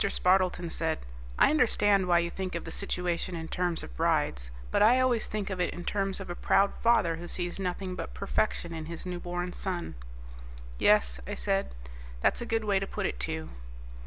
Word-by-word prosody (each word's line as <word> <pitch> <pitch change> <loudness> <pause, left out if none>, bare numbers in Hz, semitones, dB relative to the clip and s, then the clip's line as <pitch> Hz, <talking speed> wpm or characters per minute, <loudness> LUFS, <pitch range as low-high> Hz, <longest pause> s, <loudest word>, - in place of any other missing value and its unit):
Spardleton 180 -3 +2
said, 160 -1 0 0.4
"I - - +6
understand 205 -9 +3
why 175 -1 +5
you 170 0 +1
think 185 -1 -4
of 170 - -3
the - - -6
situation 180 -2 -2
in 160 -1 -5
terms 175 -1 -1
of - - -9
brides, - - +1 0.2
but - - +2
I 240 +4 +6
always 250 -3 +2
think 205 -2 -3
of 185 -1 -2
it - - -1
in 175 - -7
terms 195 -1 -1
of 195 - -6
a 175 - -3
proud 200 +2 +3
father 210 -8 +3
who 175 +1 -7
sees 175 +1 -1
nothing 185 0 -3
but - - -6
perfection 195 -3 -1
in 160 -1 -5
his 170 +1 -7
newborn 175 0 -3
son." 180 -3 -3 0.9
"Yes," 60 0 +4
I - - -3
said, 195 - -1 0.4
"that's - - +2
a 235 - -4
good 225 -1 0
way 200 -2 +2
to 195 - -3
put - - -3
it, 60 - -2
too." 80 +5 -3
180 Hz, 195 wpm, -29 LUFS, 170-195 Hz, 0.9 s, I